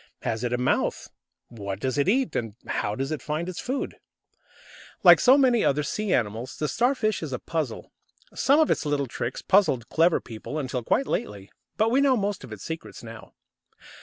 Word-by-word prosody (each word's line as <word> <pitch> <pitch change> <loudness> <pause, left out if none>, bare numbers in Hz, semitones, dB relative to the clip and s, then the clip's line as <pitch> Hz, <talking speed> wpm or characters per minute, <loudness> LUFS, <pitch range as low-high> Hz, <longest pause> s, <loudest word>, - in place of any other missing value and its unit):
Has 110 +1 -2
it 120 - -1
a 125 - +1
mouth? 125 - -1 0.4
What 100 -4 -6
does 130 +4 -1
it 145 - +2
eat, 260 +4 +1
and 115 -3 -3
how 105 0 -2
does 135 +5 -3
it 155 - -3
find 155 +3 -3
its 185 -1 -5
food? 265 +2 -3 1.1
Like - - +9
so 260 +2 +6
many 250 -5 +4
other 150 +2 +2
sea 210 +7 -2
animals, 115 +1 -1
the 150 - -1
Starfish 235 - +1
is 155 -4 -5
a 125 - -2
puzzle. 155 -7 -4 0.4
Some 280 +3 +3
of 315 - +3
its - - +1
little 145 -2 0
tricks 120 0 -5
puzzled 185 - +2
clever 165 +1 +3
people 115 +6 -7
until 130 -4 -2
quite 265 - +1
lately. 100 - -4 0.3
But 220 +1 +2
we 265 +3 +4
know 270 -3 +4
most 200 -2 -2
of - - -10
its 105 -3 -8
secrets 160 -5 -7
now. 115 -1 -11
150 Hz, 195 wpm, -25 LUFS, -, 1.1 s, Like